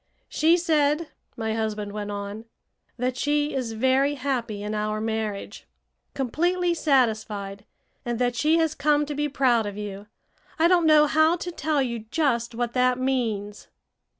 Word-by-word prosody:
"She 330 +3 +3
said," 310 -2 +1 0.3
my 220 -1 -2
husband 215 -2 -3
went 210 0 -5
on, 205 +2 -6 0.5
"that 250 +1 -1
she 290 +3 0
is 250 -4 -2
very 265 +5 +2
happy 245 -6 -3
in 210 +1 -3
our 215 0 -1
marriage, 220 -2 -4 0.5
completely 345 +7 0
satisfied, 215 -9 0 0.4
and 240 -1 -2
that 245 0 0
she 310 +6 +3
has 320 -2 +1
come 295 0 +2
to 295 - -5
be 295 +1 -1
proud 250 -6 +2
of 205 0 -6
you. 205 -1 -7 0.5
I 325 +1 +4
don't 345 -2 +4
know 305 -1 +6
how 315 +3 +3
to 355 0 -5
tell 310 -4 0
you 235 -2 -3
just 240 -7 0
what 240 0 -2
that 250 0 +2
means." 225 -6 -2
255 Hz, 155 wpm, -25 LUFS, 220-295 Hz, 0.5 s, know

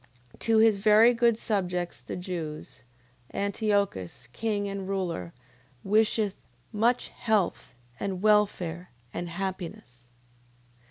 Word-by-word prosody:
To 225 -1 +2
his 220 -2 +5
very 215 +4 +6
good 235 -1 +3
subjects 180 - -2
the - - -6
Jews, 165 -8 -6 0.5
Antiochus, 200 - -1
king 205 - -1
and 195 -1 -4
ruler, 175 - -2 0.5
wisheth 210 0 +2 0.4
much 235 +4 +2
health, 210 - -1 0.2
and 190 -2 -2
welfare, 190 -5 +2 0.2
and 175 - -4
happiness. 170 -10 -6
195 Hz, 100 wpm, -28 LUFS, 175-215 Hz, 0.5 s, very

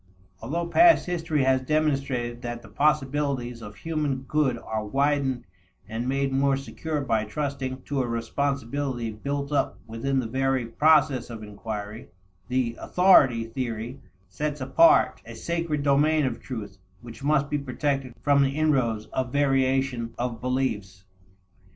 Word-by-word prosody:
Although 165 +9 -2
past 335 - +6
history 165 -5 0
has 130 0 +3
demonstrated 135 -5 -1
that 120 -1 -5
the 115 - -13
possibilities 140 -2 0
of 105 -1 -9
human 150 0 -2
good 135 -3 +1
are 110 -1 -4
widened 135 +2 0 0.4
and 115 +4 -3
made 135 0 0
more 135 0 +2
secure 150 +2 -4
by 115 -5 +1
trusting 130 +1 -4
to 140 -2 -1
a 125 - -2
responsibility 125 +1 -2
built 140 +6 -4
up 145 - 0
within 115 +4 -1
the 125 - -2
very 130 +1 0
process 140 0 +3
of 115 -2 -7
inquiry, 105 +1 -7 0.4
the 125 -2 0
"authority" 140 -11 +5
theory 120 +1 -5 0.3
sets 150 +10 -3
apart 330 - +4
a - - -10
sacred 165 -4 -2
domain 145 +2 +3
of 125 -3 -2
truth 105 -6 -7 0.2
which 115 0 -11
must 145 -1 +2
be 145 0 -1
protected 135 -1 -2
from 140 -1 +4
the 135 +1 +1
inroads 130 -9 +1
of 130 -1 -1
variation 135 -4 +1
of 120 -2 -3
beliefs. 105 -7 -2
135 Hz, 140 wpm, -26 LUFS, 115-145 Hz, 0.4 s, past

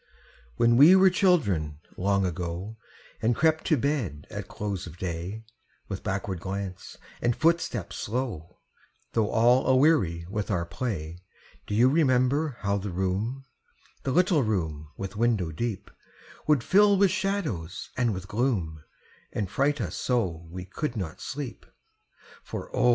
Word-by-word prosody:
When 120 - +4
we 155 +8 +9
were 190 0 +6
children, 105 - +2 0.2
long 100 +1 +1
ago, 90 +4 -4 0.5
And 115 +2 +2
crept 160 +2 +2
to 155 - +3
bed 120 - -1
at - - -5
close 100 -4 -4
of 85 0 -10
day, 90 +5 -4 0.4
With 95 -2 -4
backward 95 -2 -3
glance 95 +1 -5 0.2
and 120 -1 +2
footstep 160 - +1
slow, 105 -6 -4 0.5
Though 110 -2 +1
all 120 +3 +4
aweary 130 - +3
with 105 +2 -3
our 90 -5 0
play, 85 -6 -4 0.5
Do 105 - -2
you 120 +4 +6
remember 135 -1 +2
how 100 0 0
the 100 +1 -4
room 95 +9 -2 0.6
The - - -3
little 175 0 +3
room 80 - -2
with 95 +1 -5
window 110 -7 +1
deep 105 +4 -4 0.6
Would 150 -5 +4
fill 205 +4 +5
with 195 -1 +4
shadows 185 - -2
and 120 -2 +1
with 95 -1 -5
gloom, 100 - -1 0.5
And 100 -4 -3
fright 145 +1 +1
us - - -3
so 90 -10 -1
we 90 +1 -7
could 125 +6 -4
not 85 -7 -5
sleep? 130 -1 -6 0.8
For - - -7
O! 125 - +4
110 Hz, 145 wpm, -27 LUFS, 90-135 Hz, 0.8 s, we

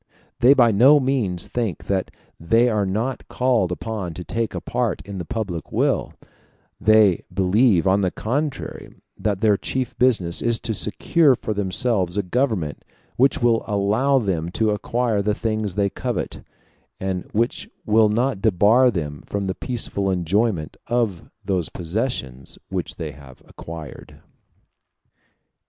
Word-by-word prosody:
They 130 +4 +6
by 120 -4 +5
no 130 +8 +6
means 125 -10 -1
think 115 -7 -3
that 95 -2 -1 0.3
they 115 +9 +3
are 105 -3 0
not 115 +7 -2
called 120 -8 +1
upon 95 -3 -4
to 90 - -6
take 115 +4 -3
a - - -2
part 120 -5 -2
in 100 -1 -6
the 90 - -5
public 95 -8 -4
weal; - - 0 0.7
they 110 -4 +4
believe, 95 0 +3
on 95 +1 +3
the 95 - +1
contrary, 135 - -4 0.2
that 105 -2 -2
their 105 -3 +4
chief 130 +3 -3
business 105 -10 +2
is 115 -1 +1
to 110 - -2
secure 135 +8 +2
for 110 - -4
themselves 100 -1 +1
a 100 - +1
government 100 - -1 0.3
which 130 -1 +2
will 115 -1 +3
allow 105 +7 +2
them 90 -8 -1
to 110 +1 +1
acquire 115 +1 0
the 105 +1 0
things 110 -4 -2
they 100 -1 +1
covet, - - -4 0.6
and 95 -1 -3
which 115 +3 -1 0.2
will 110 0 +4
not 115 -1 0
debar 110 +5 +4
them 75 - -4
from 100 0 -2
the 95 -1 -2
peaceful 100 -4 -2
enjoyment 95 -1 0
of 115 -8 -1 0.2
those 95 -5 -1
possessions 85 - -4
which - - -3
they 80 -2 -5
have 70 -3 -15
acquired. 80 -4 -10
105 Hz, 145 wpm, -22 LUFS, 90-120 Hz, 0.7 s, They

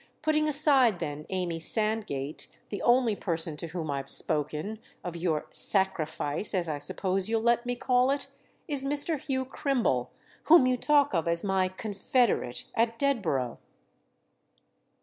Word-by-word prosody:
Putting 305 0 +2
aside 275 - +4
then 150 -3 -5
Amy 180 -3 -2
Sandgate, 205 - -1 0.2
the 200 -4 -5
only 240 -3 +3
person 165 -5 -2
to 170 - -5
whom 160 -2 -4
I've 140 -1 -4
spoken—of 160 +4 -2
your 165 -3 -1
'sacrifice,' 170 -2 +1
as 175 -2 0
I 150 -2 -3
suppose 185 +6 -1
you'll 225 -1 0
let 235 +1 +2
me 245 - -1
call 250 +1 +2
it?—is 280 0 -4
Mr. 290 +2 +1
Hugh 260 -2 -2
Crimble, 250 - -1 0.4
whom 320 -4 +7
you 255 0 +2
talk 285 +1 +2
of 165 -2 0
as 170 0 0
my 190 -2 +1
'confederate' 205 - -1
at 230 0 0
Dedborough." 180 - -1
205 Hz, 135 wpm, -28 LUFS, 165-255 Hz, 0.4 s, whom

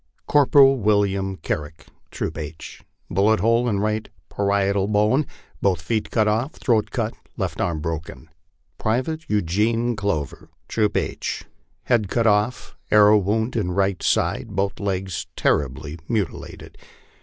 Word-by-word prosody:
" - - -43
Corporal 135 -2 +5
William 100 -2 +1
Carrick, 80 0 -5 0.2
Troop 80 - -4
H, 80 +1 -8 0.3
bullet 105 +4 +2
hole 115 +4 +2
in 100 -3 0
right 110 +1 -1 0.2
parietal 100 -1 +1
bone, 105 +8 +2 0.3
both 95 -4 +2
feet 110 +8 -2
cut 110 -2 +2
off, 115 +8 0
throat 115 -5 +1
cut, 115 -2 -2 0.2
left - - -3
arm 80 -3 -1
broken. 80 0 -5 0.3
" - - -46
Private 130 +9 -1
Eugene 105 +5 +1
Clover, 80 -7 -3 0.2
Troop 105 -2 +1
H, - - -3 0.4
head 115 -5 +2
cut 115 +1 +1
off, 105 +3 +1
arrow 105 0 +6
wound 110 +5 -1
in 95 -6 -1
right 95 -1 0
side, 105 -4 0
both 100 +1 -1
legs 95 -3 -3
terribly 75 +3 -1
mutilated. 105 -7 -4
105 Hz, 135 wpm, -23 LUFS, 95-115 Hz, 0.4 s, arrow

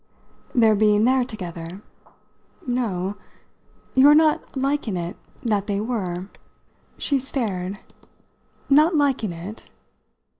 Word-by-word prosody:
"Their 225 -3 +5
being 210 0 +3
there 260 +2 +3
together?" 180 -4 -7 0.8
"No. 205 -6 -2 0.8
Your 285 +3 +7
not 310 -2 +2
liking 270 -7 -1
it 175 +3 -4 0.3
that 210 -4 0
they 200 -1 -1
were." 195 -5 -3 0.7
She 280 -2 +1
stared. 205 -8 -2 0.9
"Not 305 +5 +5
liking 270 - +1
it?" 175 +6 -8
215 Hz, 100 wpm, -23 LUFS, 190-265 Hz, 0.9 s, Your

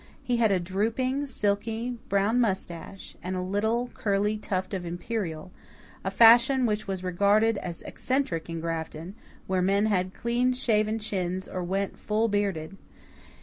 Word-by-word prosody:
He 250 -3 0
had 225 -3 +3
a 190 - +3
drooping, 230 +10 -1
silky, 225 +1 -1
brown 200 +5 +2
moustache, 190 -3 -3
and 185 +2 -3
a - - -1
little 220 +6 0
curly 205 +1 0
tuft 190 -3 -3
of 185 -2 -2
imperial, 175 -1 -4 0.5
a 195 - -1
fashion 235 +5 +6
which 215 -1 -1
was 190 -1 -3
regarded 200 +4 +3
as 170 -2 -6
eccentric 255 - -2
in 165 -1 -4
Grafton, 165 +1 -4 0.3
where 185 -1 0
men 200 +3 +3
had 185 -3 0
clean 245 +2 +1
shaven 220 -3 +1
chins 190 -3 -2
or 185 - -4
went 195 +2 -2
full 220 +2 +1
bearded. 195 -4 -1
200 Hz, 150 wpm, -27 LUFS, 185-225 Hz, 0.5 s, fashion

